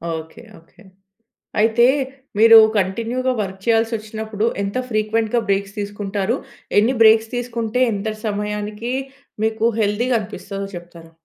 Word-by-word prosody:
Okay. 160 0 -9 0.2
Okay. 165 +6 -23 0.8
అయితే 225 +2 +4 0.5
మీరు 225 +1 +9 0.2
కంటిన్యూ‌గా 230 +7 -1
వర్క్ 190 -1 -4
చేయాల్సి 225 0 +2
వచ్చినప్పుడు, 215 0 -5 0.2
ఎంత 200 +2 -4
ఫ్రీక్వెంట్‌గా 220 +1 0
బ్రేక్స్ 200 0 -1
తీసుకుంటారు? 205 +2 -2 0.4
ఎన్ని 230 +5 +3
బ్రేక్స్ 220 0 +5
తీసుకుంటే 240 -1 -2
ఎంత 205 +1 -3 0.2
సమయానికి 210 +2 -3 0.5
మీకు 220 0 -1 0.2
హెల్ది‌గా 225 +4 +1
అనిపిస్తాదో 200 0 -6
చెప్తారా? 170 -1 -12
215 Hz, 110 wpm, -20 LUFS, 200-225 Hz, 0.8 s, మీరు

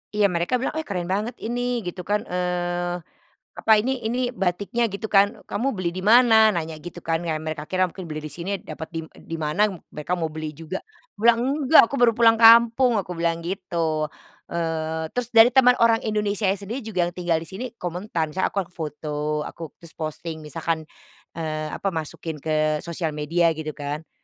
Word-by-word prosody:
Iya 205 -2 +3
mereka 170 +7 0
bilang, 250 +1 -1
"Eh, 315 - -6
keren 180 -4 -2
banget 210 +6 -1
ini," 245 0 -1
gitu 180 +1 -6
kan? 210 0 +1
Eee, 175 -1 -2 0.6
apa 220 - +1
ini 255 0 -2
"Ini 245 +2 0
batiknya," 200 +3 0
gitu 210 +1 -4
kan, 200 0 +3
"kamu 245 +7 -1
beli 185 -4 -2
di 185 +2 -6
mana?" 220 -2 +6
nanya 160 -2 -3
gitu 175 +2 -9
kan 165 +1 -1
ya 165 - 0
mereka 155 -1 -4
kira 185 +3 +1
mungkin 185 +1 -9
beli 155 0 -4
di 155 - -5
sini 170 +6 -6
dapat 155 +1 -7
dim 165 -1 -4
di 165 - -7
mana 155 +6 +2 0.2
mereka 150 +4 -4
mau 165 -3 -1
beli 155 0 -6
juga. 165 +5 -6 0.3
Aku - - -78
bilang, 235 0 +6 0.3
"Enggak 315 +5 +9
aku - - -3
baru 235 -2 +6
pulang 225 0 +5
kampung," 235 0 +6
aku 180 - -9
bilang 170 0 0
gitu. 170 -4 -2 0.4
Eee, 160 -1 -2
terus 245 -1 -1
dari 230 +1 +8
teman 250 -1 +6
orang 230 -1 +5
Indonesianya 210 -2 +1
sendiri 215 +5 -6
juga 200 -5 -1
yang 175 - -15
tinggal 170 -2 0
di 165 - -8
sini 195 +7 -5 0.2
komentar 175 -2 -2
misalnya 185 +5 0
aku - - -7
kan 180 - -9
foto 150 -2 -3
aku 165 0 -8
terus 170 -1 -9
posting 160 +1 -5
misalkan, 160 +1 -2 0.5
eee, 155 -1 -3
apa 195 - -1
masukin 160 -1 -5
ke 155 0 +1
sosial 170 -1 -2
media 165 +3 +2
gitu 155 -1 -4
kan. 145 0 -4
"Eh, - - -49
175 Hz, 195 wpm, -24 LUFS, 160-220 Hz, 0.6 s, Enggak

